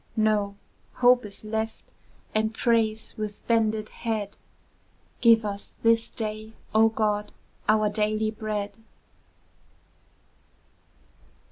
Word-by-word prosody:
No, 210 -2 +2 0.4
Hope 245 -1 +4
is 200 0 -11
left, 220 +1 -3 0.5
and 220 +1 0
prays 225 -2 +1
with 210 -1 -5
bended 220 -2 +1
head, 215 -3 -3 0.9
"Give 230 -2 +6
us 200 -1 -5
this 230 0 +4
day, 215 0 -5 0.2
O 220 +1 +6
God, 210 -1 -1 0.4
our 215 0 +4
daily 215 +1 0
bread!" 210 -2 -4
215 Hz, 95 wpm, -26 LUFS, 210-225 Hz, 0.9 s, Give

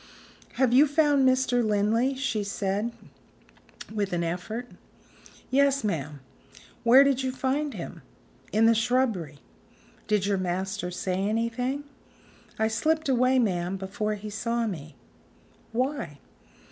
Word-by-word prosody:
"Have 255 -2 +2
you 285 +4 +7
found 290 -2 +3
Mr. 255 -1 +2
Linley?" 220 +5 +1
she 260 -6 -1
said 200 +2 -2 1.0
with 205 -3 -2
an 170 -1 0
effort. 180 +8 -4 0.8
"Yes, 275 0 +3
ma'am." 150 -8 -3 0.6
"Where 250 +4 +8
did 275 -2 +2
you 260 -1 -1
find 275 +3 -1
him?" - - -7 0.5
"In 220 +1 +3
the 230 - +6
shrubbery." 225 - 0 0.7
"Did 210 -2 +1
your 200 -1 +1
master 185 +1 -2
say 180 +1 -2
anything?" 230 +7 -1 0.7
"I 220 - +2
slipped 315 +7 0
away, 255 0 +3
ma'am, 185 -5 0
before 205 +3 -3
he 210 +1 -8
saw 230 +2 -1
me." 160 -7 -6 0.8
"Why?" 250 - -2
225 Hz, 120 wpm, -27 LUFS, 195-260 Hz, 1.0 s, Where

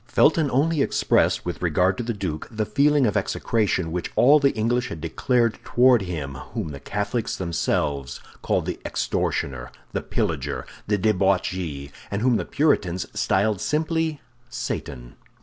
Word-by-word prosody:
Felton 155 +4 +3
only 145 +4 +2
expressed, - - +2
with 90 - -4
regard 90 +2 +2
to - - -1
the 120 - -2
duke, 95 -8 -4
the 110 -2 -2
feeling 145 +3 +3
of 105 - 0
execration 95 -7 0
which 90 +1 -3
all 145 +4 +6
the 140 -1 +4
English 120 +3 0
had 85 - -6
declared 115 - 0
toward 125 -1 +4
him 80 -7 -4 0.2
whom 80 - -2
the 70 -2 -7
Catholics 105 - -2
themselves 75 -6 -1 0.2
called - - 0
the - - -4
extortioner, 65 -3 -2 0.2
the - - -2
pillager, - - -2 0.2
the 105 0 +2
debauchee, 90 -7 0 0.2
and 100 +2 -2
whom 125 -2 +4
the - - -3
Puritans 95 - +1
styled 100 0 +1
simply 160 0 0 0.3
Satan. 70 - -5
105 Hz, 150 wpm, -24 LUFS, 85-125 Hz, 0.3 s, all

